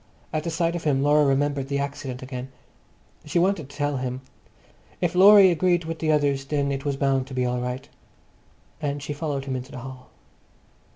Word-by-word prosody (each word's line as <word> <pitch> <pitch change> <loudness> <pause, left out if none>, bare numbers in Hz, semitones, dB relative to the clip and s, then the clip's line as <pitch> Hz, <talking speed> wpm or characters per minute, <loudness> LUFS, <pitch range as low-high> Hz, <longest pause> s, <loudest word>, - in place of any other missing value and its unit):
At 155 0 -2
the - - -1
sight 165 +1 0
of 175 - -4
him 140 -3 +1
Laura 150 +1 +4
remembered 140 0 0
the 140 0 -1
accident 140 -2 -4
again. 130 0 -6 0.7
She 150 +3 -2
wanted 175 -5 +1
to 140 - -13
tell 145 -2 0
him. 130 0 -4 0.8
If 175 -2 0
Laurie 195 +1 +8
agreed 175 0 +1
with 165 0 -5
the 155 -1 +1
others, 145 -2 +1
then 140 -1 -1
it 135 0 -3
was 140 -1 0
bound 135 -1 +1
to 130 - -8
be 125 -1 +1
all 125 0 -1
right. 125 +1 -4 0.9
And 145 -1 -3
she 145 - -4
followed 145 -2 -3
him 135 -1 -3
into 130 +1 -6
the - - -8
hall. 130 0 -10
140 Hz, 195 wpm, -24 LUFS, 135-160 Hz, 0.9 s, Laurie